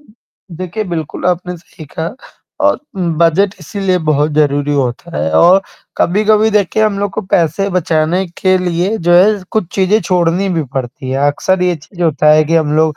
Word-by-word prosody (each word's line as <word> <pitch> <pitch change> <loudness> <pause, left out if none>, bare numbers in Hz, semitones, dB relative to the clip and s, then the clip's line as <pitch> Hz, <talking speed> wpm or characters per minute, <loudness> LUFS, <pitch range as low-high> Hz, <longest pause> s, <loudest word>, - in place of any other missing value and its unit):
देखिए, 210 - -9
बिल्कुल, 170 -2 -4
आपने 180 0 -1
सही 165 -1 -14
कहा 165 +7 -3 0.5
और - - +3 0.2
बजट 170 +3 +1
इसीलिए 185 +2 -1
बहुत 150 +1 +1
ज़रूरी 145 -1 +1
होता 125 - -3
है 80 +1 -1
और 180 - +5 0.4
कभी-कभी 215 +4 +2
देखिए 210 0 +1
हम 200 -2 0
लोग 200 -1 -1
को - - -3
पैसे 185 0 0
बचाने 175 +1 0
के 185 -1 +3
लिए 180 +4 -1
जो 175 - +5
है 195 +5 +5 0.2
कुछ 215 -6 0
चीज़ें 195 +3 +2
छोड़नी 180 +1 +1
भी 165 -4 -1
पड़ती 130 +1 -5
हैं। 135 - -1
अक्सर 180 +6 +1
ये 180 -1 +1
चीज़ 160 +5 -18
जो - - +2
होता 150 -2 +2
है 155 0 +4
कि 165 - -1
हम 150 -2 +1
लोग 155 -1 +2
175 Hz, 180 wpm, -14 LUFS, 155-195 Hz, 0.5 s, और